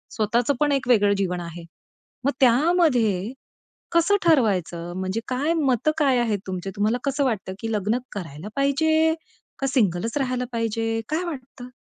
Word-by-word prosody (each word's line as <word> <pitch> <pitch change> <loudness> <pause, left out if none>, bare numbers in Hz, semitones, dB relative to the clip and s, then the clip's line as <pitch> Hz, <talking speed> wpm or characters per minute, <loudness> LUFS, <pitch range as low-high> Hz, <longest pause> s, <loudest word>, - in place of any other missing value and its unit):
स्वतःच 235 +4 +1
पण 295 -1 +2
एक 270 -2 0
वेगळं 205 -4 +4
जीवन 180 -2 -1
आहे. 170 0 -8 0.6
मग 280 - +3
त्यामध्ये 250 - +3 0.6
कसं 340 +4 +3
ठरवायचं? 190 - +1
म्हणजे 190 +4 -2
काय 280 +6 0
मतं 280 -2 +2
काय 270 -5 +3
आहेत 220 -4 0
तुमचे? 185 0 -4
तुम्हाला 215 +4 +1
कसं 275 +1 0
वाटतं, 205 -6 -2
की 225 +1 -4
लग्न 210 +3 0 0.2
करायला 165 -3 -7
पाहिजे 315 +3 +2 0.5
का 270 - 0
सिंगलच 225 -2 0
राहायला 255 -2 -1
पाहिजे, 225 0 -1
काय 315 +4 -1
वाटतं? 260 -5 -8
240 Hz, 145 wpm, -24 LUFS, 205-280 Hz, 0.6 s, वेगळं